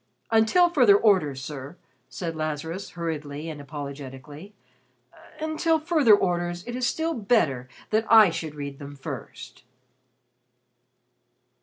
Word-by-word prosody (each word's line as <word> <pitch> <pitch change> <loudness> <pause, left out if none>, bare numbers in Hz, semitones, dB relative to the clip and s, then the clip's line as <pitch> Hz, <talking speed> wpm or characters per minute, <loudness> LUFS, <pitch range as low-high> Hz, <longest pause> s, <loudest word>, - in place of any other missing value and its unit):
"Until 225 +11 +5
further 250 -12 +5
orders, 165 -12 +2
sir," 145 +3 -8 0.3
said 165 +4 -5
Lazarus 155 +4 -4
hurriedly 155 -2 -4
and 150 -2 -8
apologetically 140 +5 -9 0.8
"until 315 +1 +1
further 305 -9 +5
orders, 175 -2 -2
it 240 - -5
is 250 -1 0
still 325 +4 -1
better 175 - +1 0.2
that 220 +1 0
I 215 -5 +8
should 155 -2 -5
read 140 -1 -7
them 145 0 -9
first." 130 -3 -9
165 Hz, 115 wpm, -25 LUFS, 145-220 Hz, 0.8 s, I